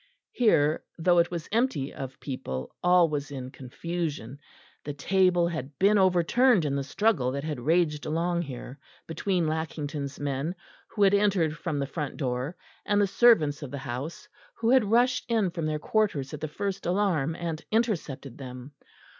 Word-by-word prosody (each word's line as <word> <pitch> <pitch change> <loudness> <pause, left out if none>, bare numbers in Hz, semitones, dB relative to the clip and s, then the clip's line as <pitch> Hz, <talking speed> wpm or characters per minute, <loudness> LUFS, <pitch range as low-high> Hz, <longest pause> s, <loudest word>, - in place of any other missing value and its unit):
Here, 155 -11 +3
though 175 +1 +4
it 170 - +3
was 170 -3 -5
empty 220 - 0
of 135 -2 -7
people, 65 - -5
all 180 -1 +5
was 145 -2 -3
in 130 -2 -6
confusion; 145 -1 -5 0.4
the 145 -1 -5
table 180 +3 +3
had 140 -4 -6
been 205 +2 +4
overturned 190 +3 +4
in 140 -1 0
the 140 - -1
struggle 145 - +1
that 140 0 -3
had 150 -4 -3
raged 155 +2 +1
along 170 +2 0
here 135 -2 -8 0.3
between 175 +2 -1
Lackington's 150 -3 -3
men, 145 +4 -2 0.3
who 205 - 0
had 195 0 +5
entered 195 -6 +2
from 165 -2 -3
the 140 - 0
front 145 +1 -5
door, 130 +4 -2 0.3
and 205 0 +1
the 205 - +4
servants 190 -9 +4
of 145 - -6
the 140 - -5
house, 135 +5 -6 0.3
who 230 +1 +1
had 255 -6 +4
rushed 245 +3 +3
in 220 -6 +2
from 165 -3 -3
their 155 0 -1
quarters 150 -6 0
at 150 - -6
the 155 - -2
first 195 +5 -4
alarm 175 -5 +1
and 165 -2 -4
intercepted 170 - -1
them. 125 0 -8
160 Hz, 170 wpm, -27 LUFS, 140-190 Hz, 0.4 s, all